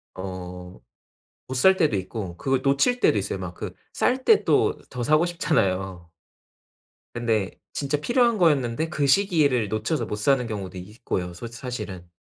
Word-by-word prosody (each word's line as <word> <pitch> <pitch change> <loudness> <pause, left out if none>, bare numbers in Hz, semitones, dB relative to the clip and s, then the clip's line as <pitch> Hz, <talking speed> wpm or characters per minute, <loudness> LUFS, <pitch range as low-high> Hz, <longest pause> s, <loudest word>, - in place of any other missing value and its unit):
어 90 -1 -7 0.7
못 130 - -5
살 190 +9 +5
때도 155 - +2
있고 95 -2 -5
그걸 135 +4 0
놓칠 140 - +2
때도 - - +3
있어요. - - -2
막 - - -6
그 - - -6 0.2
쌀 255 +1 0
때 440 - +5
또 - - +3
더 125 - -5
사고 155 +7 +3
싶잖아요. 95 - -1 1.0
근데 115 -5 0 0.2
진짜 145 +1 -1
필요한 240 - +2
거였는데 150 - +2
그 145 -3 0
시기를 145 - +3
놓쳐서 110 +9 -1
못 - - -4
사는 125 +4 +2
경우도 95 -5 -5
있고요 90 -2 -4
솔 90 +7 -7
사실은. 110 -7 -7
120 Hz, 290 characters per minute, -25 LUFS, 95-155 Hz, 1.0 s, 살